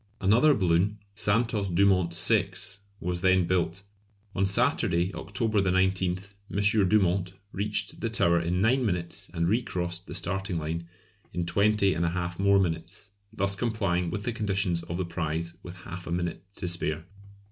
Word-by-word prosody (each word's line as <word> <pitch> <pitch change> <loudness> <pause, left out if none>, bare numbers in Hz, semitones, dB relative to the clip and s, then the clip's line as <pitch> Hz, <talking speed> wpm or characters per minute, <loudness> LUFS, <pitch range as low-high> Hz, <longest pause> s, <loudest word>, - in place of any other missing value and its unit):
Another 120 +10 +4
balloon 95 +1 +2 0.2
"Santos 105 0 +1
Dumont 95 -1 +3
VI." 95 +3 +3 0.5
was 90 0 -3
then 95 -1 +4
built. 90 +1 -1 0.5
On 95 +1 +1
Saturday, 100 - +1
October 110 +5 -1
19th, 95 +1 0 0.2
M. 100 -1 +2
Dumont 95 -3 +2 0.2
reached 105 +2 -2
the 115 - -1
Tower 85 -6 +3
in 90 +2 0
nine 125 +5 +3
minutes 90 -6 -2
and 85 0 0
recrossed 90 -4 -1
the - - -5
starting 95 -2 -1
line 80 +2 -4 0.5
in 90 -1 -2
20 100 +1 +3
1/2 85 +1 -2
more 100 0 +4
minutes, 95 +3 -3 0.2
thus 100 -2 0
complying 95 -6 0
with 100 +4 -4
the 120 - -2
conditions 95 -5 0
of 85 0 -5
the 95 - -1
prize 85 -1 -3
with 90 0 -10
half 90 -1 -8
a - - -5
minute 85 +1 -3
to 90 - -5
spare. 80 -2 0
95 Hz, 150 wpm, -27 LUFS, 85-100 Hz, 0.5 s, Another